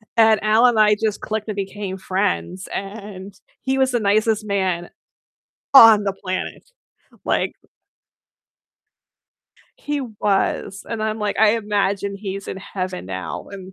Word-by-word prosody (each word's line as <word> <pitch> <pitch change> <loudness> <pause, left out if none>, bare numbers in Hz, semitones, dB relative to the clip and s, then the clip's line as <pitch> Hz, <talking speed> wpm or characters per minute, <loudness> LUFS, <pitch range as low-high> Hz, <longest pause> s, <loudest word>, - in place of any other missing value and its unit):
and 220 -2 +5
Alan 225 +3 +5
and 220 - 0
I 210 0 +5
just 215 -2 0
clicked 215 0 -4
and 210 - -3
became 195 -1 -4
friends, 190 -1 -2
and 200 -1 -7 0.3
he 265 0 0
was 265 -1 +2
the 240 - +1
nicest 215 +1 +1
man 185 -3 -1 0.8
on 225 -5 +9
the 195 -1 -1
planet. 185 - -5 0.6
Like - - 0 2.2
He 290 -1 -3
was, 205 -3 -1
and, 225 -2 -3
I'm, 220 0 -1
like 210 -1 -2
I 220 -1 +6
imagine 200 -2 -1
he's 195 -1 -6
in - - -4
heaven 185 - -5
now, 90 -2 -6
and 190 -1 -10
205 Hz, 135 wpm, -21 LUFS, 190-220 Hz, 2.2 s, on